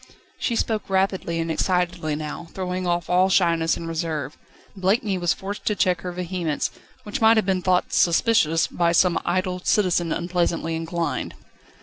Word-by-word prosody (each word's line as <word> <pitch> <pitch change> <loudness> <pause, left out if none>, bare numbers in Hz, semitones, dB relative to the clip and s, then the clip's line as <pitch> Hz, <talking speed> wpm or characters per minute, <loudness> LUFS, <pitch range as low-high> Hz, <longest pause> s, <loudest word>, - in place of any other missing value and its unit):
She 235 - -1
spoke 220 -3 -1
rapidly 190 -3 0
and 165 0 -1
excitedly 175 -3 0
now, 155 +2 -6
throwing 185 -1 -3
off 175 -1 0
all 185 +2 +3
shyness 170 -3 +2
and 165 - -6
reserve. 160 -3 -3 0.4
Blakeney 195 0 +1
was 175 -1 +1
forced 200 +2 -5
to 210 - +1
check 180 -3 +1
her 180 - -4
vehemence, 175 -4 -2 0.3
which 210 -1 -5
might 225 0 +6
have 220 - +2
been 190 -1 0
thought 180 0 +1
"suspicious" 165 -3 +3
by 170 -1 0
some 175 0 +3
idle 185 +1 -1
citizen 180 -5 +2
unpleasantly 170 -2 -1
inclined. 165 +1 -3
180 Hz, 155 wpm, -23 LUFS, 165-190 Hz, 0.4 s, might